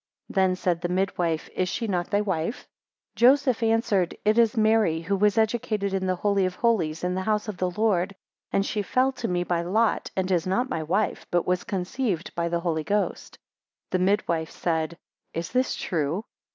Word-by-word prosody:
5 - - -9
Then 190 -1 +3
said 180 -2 -1
the 175 - -2
midwife, 180 -3 0
Is 185 0 0
she 230 - -2
not 180 -3 -1
thy 205 - +2
wife? 190 +2 -2
6 - - -25 0.5
Joseph 255 0 +4
answered, 225 -5 +1
It 215 +2 +4
is 230 0 +3
Mary, 215 -7 +3
who 190 +4 -1
was 205 +1 +2
educated 215 -3 0
in 190 -1 0
the 185 - +1
Holy 200 0 +1
of 185 - -5
Holies, 180 -11 +1
in 180 0 0
the 185 - -1
house 210 +2 0
of 210 -3 -5
the 185 0 0
Lord, 200 -1 0 0.4
and 195 - +1
she 210 - -1
fell 255 +7 +2
to 240 -3 -4
me 175 -1 0
by 175 -1 0
lot, 215 +6 +1
and 190 0 -1
is 175 -1 +1
not 245 +8 0
my 160 - -1
wife, 185 +7 -1
but 175 -1 +2
has 180 0 +1
conceived 190 -1 -2
by 170 0 -1
the 170 0 -1
Holy 160 -3 -1
Ghost. 205 +4 -2 0.5
7 185 0 +1
The 190 - +4
midwife 170 -6 0
said, 160 -1 -2 0.4
Is 165 +1 -3
this 255 +1 +1
true? 165 +4 -2
190 Hz, 205 wpm, -26 LUFS, 175-215 Hz, 0.5 s, Joseph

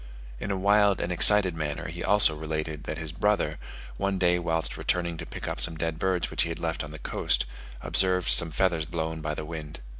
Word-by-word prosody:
In 100 - -5
a 100 - -2
wild 100 +1 +2
and 90 - -3
excited 95 +1 +7
manner 75 -2 -4
he 85 +2 -7
also 100 -5 +5
related, 75 -1 -5
that 75 - -5
his 80 -2 -5
brother, 105 +5 -1 0.4
one 100 -1 -2
day 90 -1 +2
whilst 80 -1 -2
returning 85 -1 -2
to - - -8
pick - - -8
up - - -4
some 80 -1 -2
dead 80 0 -3
birds 95 -2 -1
which - - +2
he - - 0
had 85 - -5
left 80 -1 -3
on 75 - -8
the 80 - -10
coast, - - -1 0.4
observed 90 -1 +1
some 85 - +6
feathers 85 -1 -1
blown 80 0 -5
by 75 0 -4
the 75 - -6
wind. 75 -2 -8
85 Hz, 215 wpm, -26 LUFS, 80-95 Hz, 0.4 s, excited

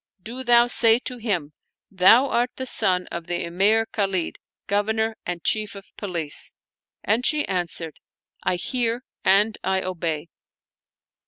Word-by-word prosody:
do 250 +4 -6
thou 240 -1 +5
say 230 -2 +4
to 250 0 -5
him: 185 -11 -2 0.4
Thou 195 +7 +6
art 245 -1 +1
the 260 - -5
son 185 -7 +1
of 170 -1 -6
the 175 - -2
Emir 200 +6 +2
Khalid, 195 -6 -2 0.3
Governor 220 +2 0
and 175 -1 -4
Chief 215 -2 +1
of 200 0 -13
Police." 170 -7 -1 0.5
And 220 +5 +1
she 300 +2 +1
answered, 175 -3 -3 0.3
" - - -29
I - - +1
hear 240 +5 -1 0.2
and 205 +3 +3
I 190 0 0
obey." 170 -3 -3
205 Hz, 145 wpm, -23 LUFS, 180-230 Hz, 0.5 s, Thou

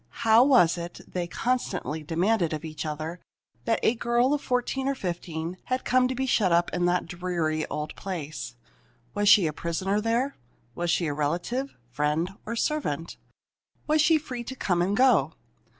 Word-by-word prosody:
How 225 +2 +7
was 180 - +4
it, 170 +1 -7
they 175 -1 -3
constantly 185 -8 -2
demanded 170 +3 +1
of 155 +1 -4
each 155 0 -5
other, 155 +3 -5 0.5
that 225 - +1
a - - +4
girl 240 +3 +2
of 295 - 0
fourteen 255 +1 -1
or 275 - +1
fifteen 170 -4 -4
had 255 0 -2
come 255 0 +3
to 260 - -3
be 265 +1 -1
shut 215 -7 +2
up 170 +1 +2
in 175 0 +1
the 180 0 +2
dreary 170 -3 -2
old 150 0 -4
place? 155 -9 -6 0.6
Was 205 0 +2
she 200 -5 +7
a 155 - -1
prisoner 185 +6 -1
there? 235 +5 0 0.4
Was 175 +4 -2
she 175 0 +2
a 150 - -1
relative, 175 - -2
friend, 150 +6 0 0.2
or 230 - -2
servant? 225 - -2 0.7
Was 305 0 +3
she 315 +1 +5
free 250 -5 -6
to 260 - -6
come 180 -8 0
and 195 +4 +1
go? 260 0 +4
180 Hz, 175 wpm, -26 LUFS, 165-245 Hz, 0.7 s, How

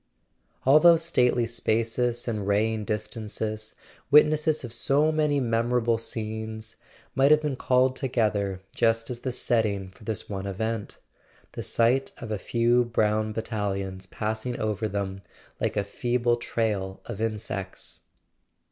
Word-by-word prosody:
All 140 +4 +7
those 165 0 +6
stately 125 -7 +2
spaces 115 +1 0
and 105 -4 -2
raying 105 +1 +1
distances, 110 0 -4 0.3
witnesses 150 +1 +5
of 120 -2 -7
so 140 +6 +2
many 150 -2 +2
memorable 115 -1 +1
scenes, 110 0 -5 0.4
might 135 +1 +4
have 155 0 +5
been 145 -3 -1
called 130 0 +2
together 105 -7 0
just 115 +1 +1
as 120 - -4
the 130 - -3
setting 105 -6 0
for 95 - -18
this 110 -2 -3
one 100 -1 -4
event—the 110 +2 -6
sight 120 +4 +2
of 110 - -7
a 105 - -1
few 120 +2 +2
brown 110 -2 +1
battalions 100 -4 -3
passing 110 +5 -3
over 110 0 -1
them 95 -1 -3 0.4
like - - -1
a 100 - +2
feeble 120 +3 0
trail 105 -5 -2
of 110 -3 -6
insects. 105 -4 -3
115 Hz, 130 wpm, -26 LUFS, 105-125 Hz, 0.4 s, All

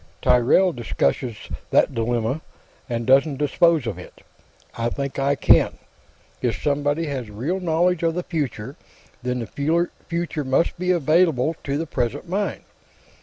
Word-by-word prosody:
"Tyrrell 130 +9 +4
discusses 120 - -1 0.3
that - - +3
dilemma, 120 +4 -1 0.5
and 115 -1 -2
doesn't 135 +2 +4
dispose 150 +1 +3
of 100 -6 -4
it. 90 - -13 0.5
I 115 0 -1
think 140 +2 -4
I 140 +1 +2
can. - - +4 0.6
If 120 -2 -1
somebody 145 +2 0
has 130 -7 -4
real 135 - -2
knowledge 175 0 +1
of 165 -1 +1
the 180 - -2
future, 140 -7 -4 0.4
then 125 0 -2
the 160 - 0 0.2
future 170 -3 -2
must 135 +6 +1
be 180 0 -1
available 160 -3 +3
to 140 0 -1
the 165 - -2
present 135 +2 -3
mind. 195 -1 -2
140 Hz, 140 wpm, -23 LUFS, 125-165 Hz, 0.6 s, Tyrrell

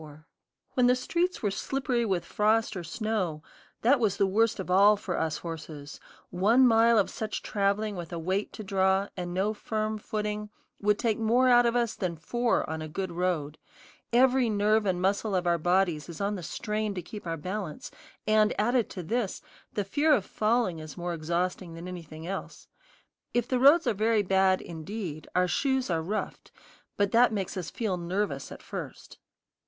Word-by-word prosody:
When 250 -1 +4
the 250 - +5
streets 340 +7 -1
were 205 - +1
slippery 250 +2 -1
with 185 -5 -1
frost 220 +1 +1
or 180 - -4
snow, 180 -4 -2 0.4
that 255 +4 +5
was 205 -4 +1
the 200 - +3
worst 215 +3 +2
of 185 -1 -4
all 200 +3 +6
for 185 -3 -4
us 160 -2 -1
horses; 155 -3 -8 0.3
one 220 +8 +4
mile 230 0 +5
of 205 - +3
such 220 -1 -4
traveling 205 +1 0
with 175 -2 -7
a 170 - -4
weight 185 +5 -1
to 215 - -7
draw, 190 0 +1
and 180 -1 -4
no 195 +4 0
firm 215 0 -3
footing, 210 0 -3 0.3
would 210 0 +2
take 230 -3 0
more 240 +3 +3
out 240 -1 +6
of 235 - 0
us 235 -2 +1
than 185 -6 -3
four 240 +9 0
on 160 0 -4
a 155 - -5
good 185 +4 -4
road; 170 -4 -2 0.5
every 250 0 +4
nerve 210 0 +2
and 180 -1 0
muscle 200 +1 +1
of 180 -1 0
our 170 -1 +2
bodies 175 -2 +1
is 165 - -8
on 200 +1 0
the 195 - -5
strain 210 +5 -3
to 180 - -4
keep 205 +2 -9
our 165 0 -2
balance; 180 0 -5 0.3
and, 215 0 +3
added 240 +2 +2
to 180 - -6
this, 220 +3 -2 0.3
the 205 - -1
fear 295 +10 +3
of 205 -7 -2
falling 215 -6 0
is 155 +2 -9
more 175 0 -3
exhausting 170 +2 -2
than 170 +2 -8
anything 165 -3 -8
else. 195 +2 -6 0.7
If 240 -1 +1
the 255 -1 0
roads 290 +6 +6
are - - +2
very 215 +1 +2
bad, 190 0 +3
indeed, 165 -1 -6
our 180 0 +3
shoes 265 +1 0
are 165 -1 +1
roughed, 200 +7 -4 0.5
but 200 -1 +1
that 240 +1 +5
makes 200 -3 -3
us 180 -4 -4
feel 210 -6 -2
nervous 175 -5 -2
at - - -10
first. - - -8
200 Hz, 185 wpm, -28 LUFS, 175-225 Hz, 0.7 s, all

